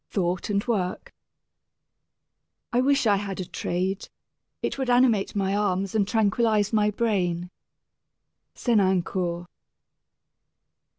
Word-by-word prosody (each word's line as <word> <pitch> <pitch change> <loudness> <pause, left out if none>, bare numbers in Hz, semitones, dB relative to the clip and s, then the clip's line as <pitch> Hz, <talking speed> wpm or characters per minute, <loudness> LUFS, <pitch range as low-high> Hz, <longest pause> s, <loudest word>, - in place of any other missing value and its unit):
III - - -30
THOUGHT 180 -1 -1
AND 200 -1 +1
WORK 190 -6 -2 1.6
I 245 - +3
wish 275 0 +2
I 205 -2 +4
had 195 -1 -5
a 185 - -3
trade! 185 +2 -3 0.5
It - - -2
would 265 -2 -1
animate 245 -6 +3
my 195 -1 0
arms 195 -2 0
and 210 -3 +1
tranquilize 215 -1 +2
my 210 -1 +3
brain. 185 -5 -1 1.0
SENANCOUR. 185 -5 +1
200 Hz, 110 wpm, -25 LUFS, 185-220 Hz, 1.6 s, I